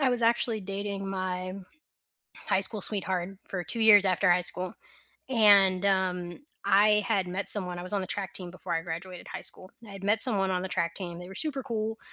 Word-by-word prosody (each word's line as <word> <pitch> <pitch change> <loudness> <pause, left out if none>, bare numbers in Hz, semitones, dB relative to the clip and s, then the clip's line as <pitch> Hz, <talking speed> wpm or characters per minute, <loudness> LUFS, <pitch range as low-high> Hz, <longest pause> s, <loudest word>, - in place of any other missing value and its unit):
I 275 - +2
was 245 -1 -2
actually 230 -1 0
dating 195 0 -6
my 185 -1 -4 0.8
high 190 - -1
school 205 +1 +6
sweetheart 190 -3 -1 0.2
for 180 -3 -5
2 170 +9 -5
years 210 -3 +6
after 185 +1 +1
high 175 0 +3
school, 180 +1 +1 0.6
and, 200 -6 +4
um, 180 -2 -2 0.3
I 210 +1 +3
had 195 -5 -1
met 190 +3 +3
someone 180 -4 +3
I - - -7
was 180 +3 -5
on 200 - -1
the 185 - -5
track 195 0 -5
team 180 -2 -8
before 180 0 -8
I 165 - -1
graduated 175 +2 -8
high - - -8
school. 185 - -4 0.2
I - - -13
had 195 - -11
met 210 +2 +7
someone 200 -7 +3
on 180 -1 -2
the 190 - -5
track 170 -2 -2
team, 175 -3 -7
they 180 +1 -10
were 190 - -11
super 275 +3 0
cool, 225 -3 -4
190 Hz, 215 wpm, -27 LUFS, 180-210 Hz, 0.8 s, met